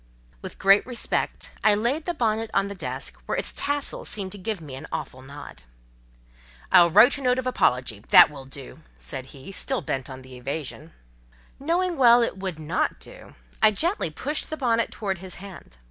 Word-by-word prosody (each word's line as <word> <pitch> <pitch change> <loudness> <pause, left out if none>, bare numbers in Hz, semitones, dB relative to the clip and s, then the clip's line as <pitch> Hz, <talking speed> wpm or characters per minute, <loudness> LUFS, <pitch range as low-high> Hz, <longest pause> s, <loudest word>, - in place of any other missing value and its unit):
With - - -8
great 195 +1 +5
respect, 245 -2 -2
I 215 -1 +5
laid 250 +9 -1
the 350 - -2
bonnet 225 -4 0
on 200 0 +2
the - - -5
desk, 185 - -5
where - - -1
its - - -2
tassel 285 0 -1
seemed 195 -3 0
to 205 - -7
give 210 +1 -3
me 150 -5 -10
an 135 - -8
awful 130 - -5
nod. 140 - -11 1.1
"I'll 175 -1 +7
write 245 - +6
a - - -8
note 250 -1 +2
of 260 - -2
apology—that 125 - +4
will 135 -2 -10
do!" 135 0 -10 0.2
said 65 - -6
he, 135 +6 -11
still 250 +1 -2
bent 135 -1 -3
on 130 0 -10
evasion. 140 +5 -7 0.7
Knowing 340 +4 0
well 240 -2 +6
it 230 - -2
would 190 -4 -4
not 155 +2 -2
do, - - -12 0.3
I 215 - +7
gently 320 - +1
pushed 290 - -3
the 315 - -4
bonnet 230 -4 +1
towards 195 -4 -4
his 185 0 -8
hand. 190 - -12
195 Hz, 180 wpm, -25 LUFS, -, 1.1 s, I'll